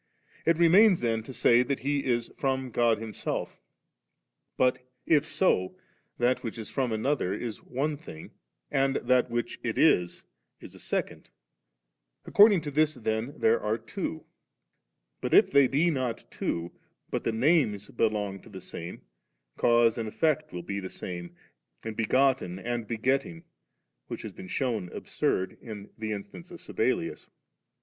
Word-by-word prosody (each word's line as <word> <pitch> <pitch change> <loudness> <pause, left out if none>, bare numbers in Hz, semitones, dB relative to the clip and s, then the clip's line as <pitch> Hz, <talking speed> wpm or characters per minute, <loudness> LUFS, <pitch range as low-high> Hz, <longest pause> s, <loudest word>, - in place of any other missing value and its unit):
It 165 -1 +4
remains 180 +3 +6
then 115 -2 0
to 115 - -10
say 120 -1 +4
that 135 +2 -2
He 140 +1 0
is 120 -2 0
from 130 -2 -1
God 115 -1 +3
Himself; 110 0 -5 1.0
but 125 -1 +3 0.3
if 155 -1 +3
so, 95 - +1 0.4
that 125 +1 +2
which 115 -3 -5
is 110 -3 -7
from 130 -4 0
another 110 -2 0
is 115 -4 -5
one 145 +4 -2
thing, 110 - -11 0.4
and 135 0 +2
that 125 0 +3
from 120 - -11
which 120 0 -2
it - - -3
is, 90 0 +3 0.4
is - - -12
a - - -14
second; - - -3 1.0
accord 210 +2 +7
ing 190 -5 +2
to 145 - -5
this 155 +1 +2
then 110 +3 -2
there 455 +2 +3
are - - 0
twa - - -5 1.0
But - - +1
if 410 - +6
they 140 -2 +6
be 155 +7 +2
not 130 -5 -2
two, 85 +1 -3 0.4
but - - -2
the - - 0
names 115 - +2
belong 105 -3 -1
to - - -16
the 95 -3 -9
same, 85 -1 -8 0.5
cause 120 -1 +3
and 110 -1 -3
effect 155 +4 0
will 90 -1 -6
be 100 +3 -3
the 95 -1 -6
same, 85 -1 -7 0.5
and 110 -1 -5
begotten 125 -4 +2
and 120 +2 -3
begetting, 135 +8 -1 0.6
which - - -6
has - - -7
been 95 - -10
shewn 110 -5 -2
absurd 95 0 -2
in 105 -3 -9
Ae 110 - -2
instance 100 -4 -7
of - - -10
Sabellius. - - -2
120 Hz, 155 wpm, -28 LUFS, 110-140 Hz, 1.0 s, accord